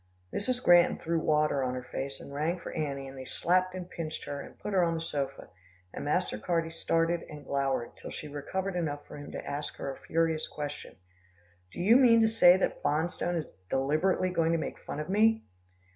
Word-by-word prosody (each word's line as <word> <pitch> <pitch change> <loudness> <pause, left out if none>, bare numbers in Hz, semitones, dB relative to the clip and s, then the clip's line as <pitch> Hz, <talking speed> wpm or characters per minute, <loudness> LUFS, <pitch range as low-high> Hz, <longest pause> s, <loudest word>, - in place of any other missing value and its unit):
Mrs. 250 +4 -1
Granton 175 0 +6
threw 165 0 -1
water 150 -3 +2
on 130 -1 -1
her 125 - -5
face, 135 +2 -5
and 140 - -10
rang 155 +5 0
for 170 - -7
Annie 140 -3 -3
and 135 - -9
they 130 - -7
slapped 185 +6 +1
and 180 -1 -5
pinched 160 -3 -5
her, 140 -1 -4
and - - -12
put 210 - -5
her 185 -2 +4
on 165 -1 +1
the - - -2
sofa, 140 -4 -4 0.4
and - - -5
Master 105 - 0
Carty 165 +5 0
stared 165 0 +1
and 155 -4 -5
glowered, 135 -3 -1
till - - -9
she 150 - -7
recovered 180 +7 -3
enough 145 -4 -2
for - - -10
him 145 0 -8
to - - -6
ask 145 +1 -4
her - - -4
a - - -13
furious 165 -1 +1
question, 145 -1 -6 0.7
"Do - - -10
you 215 +7 +6
mean 240 -4 +6
to 225 - +5
say 205 -5 +7
that 190 - -1
Bonstone 170 +3 0
is 160 - -5 0.2
deliberately 155 +7 +1
going 165 -2 +2
to - - +3
make 160 - -5
game - - -4
of 150 - -4
me?" 220 +3 +3
165 Hz, 210 wpm, -30 LUFS, 145-180 Hz, 0.7 s, say